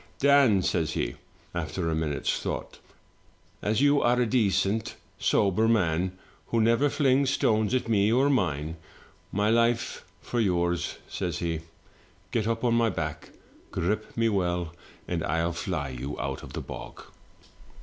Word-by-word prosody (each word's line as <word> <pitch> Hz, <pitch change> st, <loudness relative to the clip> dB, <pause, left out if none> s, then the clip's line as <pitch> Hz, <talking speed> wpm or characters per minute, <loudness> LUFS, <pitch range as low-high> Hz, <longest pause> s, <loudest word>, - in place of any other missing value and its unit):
" -, -, -33 dB
'Dan,' 135 Hz, -9 st, +5 dB
says 80 Hz, -2 st, 0 dB
he, -, -, -1 dB, 0.4 s
after 85 Hz, +1 st, -3 dB
a 80 Hz, -, 0 dB
minute's 75 Hz, -3 st, -1 dB
thought, -, -, -5 dB, 0.8 s
'as 110 Hz, +4 st, +1 dB
you 145 Hz, 0 st, +4 dB
are 120 Hz, +1 st, +3 dB
a 125 Hz, -, +3 dB
decent 105 Hz, -2 st, +1 dB, 0.2 s
sober 105 Hz, +3 st, +2 dB
man, 90 Hz, -4 st, +1 dB, 0.3 s
who 115 Hz, -, 0 dB
never 115 Hz, +6 st, +3 dB
flings 135 Hz, -1 st, +2 dB
stones 110 Hz, -3 st, +2 dB
at 130 Hz, -, -1 dB
me 105 Hz, -1 st, +3 dB
or 130 Hz, +4 st, +4 dB
mine, 80 Hz, -, 0 dB, 0.5 s
my 105 Hz, +2 st, +1 dB
life 115 Hz, +1 st, +1 dB, 0.2 s
for 120 Hz, -, -3 dB
yours,' 90 Hz, -4 st, 0 dB
says -, -, -3 dB
he; 85 Hz, -2 st, -2 dB, 0.7 s
'get 110 Hz, -2 st, 0 dB
up 115 Hz, 0 st, -1 dB
on 120 Hz, -1 st, +3 dB
my 115 Hz, -1 st, +3 dB
back, 80 Hz, -5 st, -4 dB, 0.4 s
grip 105 Hz, +7 st, -2 dB
me 115 Hz, 0 st, +3 dB
well, 90 Hz, -5 st, 0 dB, 0.3 s
and -, -, -2 dB
I'll 80 Hz, +2 st, 0 dB
fly 70 Hz, -4 st, -3 dB
you 65 Hz, +3 st, -5 dB
out 70 Hz, -1 st, -3 dB
of -, -, -11 dB
the -, -, -4 dB
bog.' -, -, -9 dB
105 Hz, 150 wpm, -27 LUFS, 85-115 Hz, 0.8 s, Dan